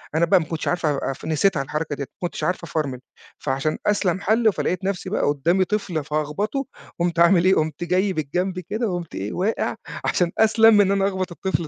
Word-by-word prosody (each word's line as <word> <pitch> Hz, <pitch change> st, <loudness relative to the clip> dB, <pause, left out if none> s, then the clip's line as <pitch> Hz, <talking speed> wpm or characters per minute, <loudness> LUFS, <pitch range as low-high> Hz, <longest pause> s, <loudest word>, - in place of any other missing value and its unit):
أنا 165 Hz, +1 st, +4 dB
بقى 185 Hz, +2 st, +4 dB
ما 160 Hz, -, -3 dB
كنتش 160 Hz, 0 st, -4 dB
عارف 175 Hz, -2 st, 0 dB
أف 140 Hz, -1 st, -2 dB
نسيتها 160 Hz, 0 st, +2 dB
الحركة 150 Hz, +2 st, -3 dB
ديّة، 140 Hz, -, -4 dB
ما 175 Hz, -, -5 dB
كنتش -, -, -7 dB
عارف 180 Hz, -1 st, -1 dB
أفرمل، 150 Hz, -6 st, -3 dB, 0.4 s
فعشان 135 Hz, +2 st, -1 dB
أسْلَم 195 Hz, -3 st, +1 dB
حل 220 Hz, +1 st, +3 dB
فلقيت 185 Hz, +1 st, -2 dB
نفْسي 190 Hz, -1 st, -2 dB
بقى 210 Hz, -, -1 dB
قدامي 170 Hz, +7 st, +2 dB
طفل 185 Hz, -6 st, -2 dB
فهاخبطه، 155 Hz, -, -2 dB, 0.3 s
قُمت 170 Hz, 0 st, 0 dB
عامل 170 Hz, +1 st, +5 dB
إيه؟ 190 Hz, +1 st, +5 dB
قُمت 155 Hz, +1 st, -1 dB
جاي 185 Hz, +3 st, +1 dB
بالجنب 180 Hz, +5 st, -2 dB
كده، 215 Hz, +6 st, -3 dB
وقُمت 175 Hz, -3 st, -5 dB
إيه، 100 Hz, +2 st, -4 dB
واقع، 200 Hz, +5 st, -1 dB, 0.3 s
عشان 175 Hz, -2 st, +1 dB
أسْلَم 220 Hz, 0 st, +6 dB
من -, -, +7 dB
إن 195 Hz, -, +1 dB
أنا 195 Hz, 0 st, +2 dB
أخبط 185 Hz, -2 st, -3 dB
الطفل 175 Hz, -2 st, -2 dB
175 Hz, 200 wpm, -23 LUFS, 155-195 Hz, 0.4 s, من